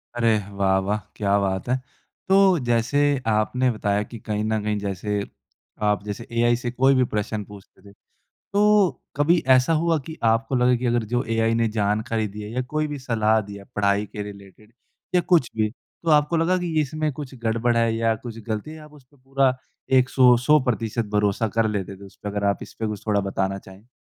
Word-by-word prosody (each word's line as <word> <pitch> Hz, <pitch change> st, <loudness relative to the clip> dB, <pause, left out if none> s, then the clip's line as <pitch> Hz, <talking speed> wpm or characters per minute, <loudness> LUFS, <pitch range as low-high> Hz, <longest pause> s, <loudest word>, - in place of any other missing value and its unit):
अरे! 115 Hz, -2 st, +3 dB
वाह, 100 Hz, -1 st, +1 dB
वाह, 100 Hz, +2 st, -1 dB, 0.2 s
क्या 100 Hz, -1 st, +1 dB
बात 95 Hz, 0 st, -2 dB
है! 125 Hz, -, +3 dB, 0.5 s
तो 190 Hz, -3 st, +5 dB
जैसे 120 Hz, +4 st, +1 dB, 0.3 s
आपने 110 Hz, +4 st, +1 dB
बताया 105 Hz, -1 st, 0 dB
कि 115 Hz, +2 st, -10 dB
कहीं 105 Hz, 0 st, -3 dB
न 110 Hz, 0 st, 0 dB
कहीं 105 Hz, 0 st, -1 dB
जैसे 100 Hz, +1 st, -3 dB, 0.7 s
आप 105 Hz, 0 st, 0 dB
जैसे 105 Hz, +2 st, -6 dB
एआई 120 Hz, 0 st, +3 dB
से 120 Hz, 0 st, -4 dB
कोई 135 Hz, +2 st, +3 dB
भी 130 Hz, -, +4 dB
प्रश्न 105 Hz, 0 st, -2 dB
पूछते 100 Hz, -2 st, -15 dB
थे -, -, -15 dB, 0.6 s
तो 205 Hz, -2 st, +4 dB, 0.3 s
कभी 155 Hz, +5 st, +3 dB, 0.2 s
ऐसा 130 Hz, +5 st, +2 dB
हुआ 165 Hz, -1 st, +2 dB
कि 160 Hz, -, -7 dB
आपको 115 Hz, +3 st, 0 dB
लगे 125 Hz, 0 st, +3 dB
कि 125 Hz, +1 st, -3 dB
अगर 120 Hz, -1 st, +1 dB
जो 120 Hz, -, +2 dB
एआई 115 Hz, 0 st, +2 dB
ने 115 Hz, 0 st, +2 dB
जानकारी 110 Hz, +2 st, 0 dB
दी 105 Hz, +1 st, -8 dB
है 105 Hz, -, -7 dB
या 125 Hz, +3 st, -2 dB
कोई 155 Hz, 0 st, 0 dB
भी 145 Hz, -1 st, -5 dB
सलाह 110 Hz, -4 st, +1 dB
दिया, 100 Hz, -1 st, -9 dB
पढ़ाई 100 Hz, 0 st, +1 dB
के 105 Hz, -, -6 dB
रिलेटेड 100 Hz, +1 st, -12 dB, 0.4 s
या 180 Hz, -, +5 dB
कुछ 170 Hz, -7 st, +2 dB
भी 110 Hz, -1 st, +1 dB
तो 160 Hz, +7 st, -7 dB
आपको 150 Hz, +2 st, +3 dB
लगा 165 Hz, +3 st, +2 dB
कि 175 Hz, -2 st, -3 dB
इसमें 155 Hz, +1 st, -1 dB
कुछ 140 Hz, -1 st, -8 dB
गड़बड़ 115 Hz, +1 st, +1 dB
है 115 Hz, -1 st, +2 dB
या 115 Hz, 0 st, +1 dB
कुछ 115 Hz, -1 st, -7 dB
गलती 110 Hz, +6 st, -3 dB
है 160 Hz, -, -9 dB
आप 150 Hz, 0 st, -14 dB
उस 145 Hz, -3 st, -17 dB
पे 145 Hz, +3 st, -28 dB
पूरा 135 Hz, 0 st, +1 dB, 0.4 s
एक 130 Hz, 0 st, +2 dB
सौ 125 Hz, -2 st, +6 dB
सौ 150 Hz, +6 st, +4 dB
प्रतिशत 115 Hz, -2 st, -1 dB
भरोसा 105 Hz, +2 st, +1 dB
कर 110 Hz, -1 st, +3 dB
लेते 100 Hz, -2 st, -3 dB
थे 100 Hz, -, -13 dB
उस 95 Hz, -, -15 dB
पे 105 Hz, -, -4 dB
अगर 100 Hz, 0 st, -3 dB
आप 100 Hz, 0 st, +1 dB
इस -, -, -11 dB
पे 110 Hz, -, 0 dB
कुछ 105 Hz, 0 st, -6 dB
थोड़ा 105 Hz, -1 st, +2 dB
बताना 95 Hz, 0 st, -2 dB
चाहें? 95 Hz, +3 st, -15 dB
115 Hz, 210 wpm, -23 LUFS, 105-130 Hz, 0.7 s, सौ